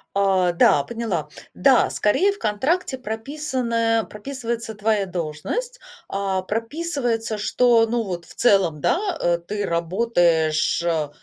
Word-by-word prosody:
А, 190 Hz, -3 st, +3 dB
да, 150 Hz, -4 st, +4 dB
поняла. 215 Hz, -7 st, -3 dB, 0.3 s
Да, 250 Hz, +7 st, +4 dB
скорее 370 Hz, -, +2 dB
в -, -, -13 dB
контракте 260 Hz, -, -1 dB
прописано, 230 Hz, -2 st, -1 dB
прописывается 230 Hz, -1 st, -5 dB
твоя 205 Hz, -1 st, 0 dB
должность. 180 Hz, -, -4 dB, 0.3 s
А, 195 Hz, -1 st, -2 dB
прописывается, 230 Hz, -, -2 dB
что, 230 Hz, +1 st, +3 dB
ну 235 Hz, 0 st, 0 dB
вот, 175 Hz, -4 st, -5 dB
в -, -, -16 dB
целом, 190 Hz, -9 st, +3 dB
да, 340 Hz, -, +1 dB, 0.2 s
э, 170 Hz, 0 st, +1 dB
ты 205 Hz, +4 st, -4 dB
работаешь, 170 Hz, -3 st, +1 dB
э, 160 Hz, -4 st, 0 dB
215 Hz, 125 wpm, -22 LUFS, 175-235 Hz, 0.3 s, да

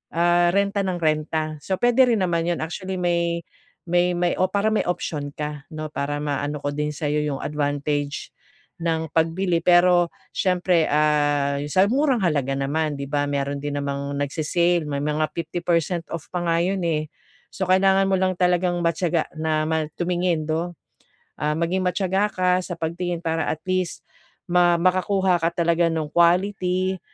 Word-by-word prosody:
ah, 175 Hz, +1 st, +4 dB
renta 200 Hz, 0 st, +1 dB
nang 190 Hz, -2 st, -1 dB
renta. 155 Hz, 0 st, -1 dB
So, 190 Hz, +6 st, -2 dB
pwede 245 Hz, +5 st, +4 dB
rin 225 Hz, -5 st, +2 dB
naman 170 Hz, -2 st, 0 dB
yun 175 Hz, -2 st, -1 dB
actually 185 Hz, +4 st, -5 dB
may 170 Hz, -1 st, 0 dB, 0.4 s
may 175 Hz, +1 st, +2 dB
may 175 Hz, 0 st, +1 dB
o 185 Hz, -, +3 dB
para 205 Hz, +3 st, +1 dB
may 215 Hz, -, +2 dB
option 150 Hz, -4 st, -3 dB
ka 150 Hz, -1 st, -5 dB
'no? 155 Hz, -1 st, -6 dB
Para 145 Hz, +1 st, -2 dB
maano 145 Hz, 0 st, -2 dB
ko 145 Hz, -, -1 dB
din 150 Hz, +1 st, -1 dB
sayo 150 Hz, 0 st, -1 dB
yung 150 Hz, -2 st, -2 dB
advantage 145 Hz, 0 st, -2 dB, 0.5 s
ng 160 Hz, -2 st, -1 dB
pagbili. 165 Hz, +2 st, +1 dB
Pero 175 Hz, 0 st, +5 dB, 0.2 s
siyempre, 180 Hz, -3 st, +1 dB
ah, 145 Hz, -2 st, +2 dB
sa 185 Hz, +6 st, +3 dB
murang 265 Hz, -4 st, +2 dB
halaga 140 Hz, -6 st, +1 dB
naman, 145 Hz, +2 st, -1 dB
'di 140 Hz, -, -4 dB
ba? 145 Hz, -1 st, +1 dB
Meron 140 Hz, 0 st, -2 dB
din 145 Hz, 0 st, -4 dB
namang 140 Hz, 0 st, -3 dB
nagse-sale 160 Hz, +3 st, 0 dB
may 140 Hz, -1 st, -2 dB
mga 150 Hz, +1 st, 0 dB
50% 170 Hz, 0 st, -1 dB
off 165 Hz, -2 st, -7 dB
pa 180 Hz, -, -2 dB
nga 165 Hz, 0 st, +2 dB
yun, 190 Hz, +2 st, 0 dB
eh. 155 Hz, -2 st, -1 dB, 0.4 s
So, -, -, -2 dB
kailangan 195 Hz, +1 st, +4 dB
mo -, -, +4 dB
lang 185 Hz, 0 st, +1 dB
talagang 180 Hz, 0 st, +2 dB
matiyaga 170 Hz, 0 st, 0 dB
na 155 Hz, -1 st, 0 dB
ma 160 Hz, -1 st, 0 dB
tumingin 175 Hz, -3 st, 0 dB
'no? 170 Hz, +3 st, -1 dB, 0.7 s
Ah, 150 Hz, 0 st, 0 dB
maging 170 Hz, +3 st, 0 dB
matiyaga 190 Hz, +2 st, +1 dB
ka 185 Hz, -1 st, 0 dB
sa 180 Hz, -1 st, -6 dB
pagtingin 170 Hz, +1 st, -3 dB
para 160 Hz, 0 st, -1 dB
at 155 Hz, -, -3 dB
least 185 Hz, -2 st, -2 dB, 0.5 s
ma 175 Hz, -1 st, +4 dB
makakuha 185 Hz, +1 st, +2 dB
ka 165 Hz, +1 st, +1 dB
talaga 170 Hz, 0 st, +2 dB
nung 155 Hz, -2 st, -3 dB
quality 185 Hz, +1 st, +2 dB
170 Hz, 165 wpm, -23 LUFS, 150-180 Hz, 0.7 s, Pero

